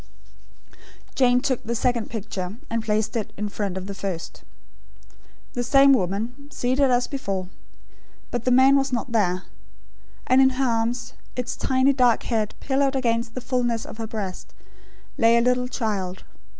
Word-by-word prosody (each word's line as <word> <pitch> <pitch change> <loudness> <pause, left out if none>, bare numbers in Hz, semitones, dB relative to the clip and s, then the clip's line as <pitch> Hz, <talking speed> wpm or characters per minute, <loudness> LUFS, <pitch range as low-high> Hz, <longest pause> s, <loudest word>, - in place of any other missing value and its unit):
Jane 250 -1 +3
took 260 -3 -1
the 235 +1 -2
second 235 0 0
picture, 195 -3 -5 0.2
and 230 -1 -1
placed 215 +1 0
it 220 -3 -2
in 210 +1 -2
front 200 -2 -3
of 190 - -5
the 200 - -5
first. 190 -4 -5 1.1
The 245 - -1
same 275 +2 +6
woman, 230 +7 -2
seated 260 +1 +1
as 245 0 +3
before; 195 -9 -4 0.8
but 240 -2 -2
the 255 - +1
man 260 +2 +6
was 275 -1 +1
not 245 0 -2
there; 185 -5 +1 0.8
and 255 +1 +5
in 265 - +6
her 270 - +2
arms, 230 +1 -1 0.2
its 250 -1 -3
tiny 260 +1 +2
dark 250 -3 +3
head 220 -3 -1
pillowed 275 0 +1
against 230 -2 0
the 255 - -4
fulness 240 -2 -1
of - - -9
her 225 - -3
breast, 205 -4 -6 0.6
lay 230 -1 +5
a - - +4
little 250 +1 +2
child. 200 -7 -3
235 Hz, 160 wpm, -24 LUFS, 210-255 Hz, 1.1 s, same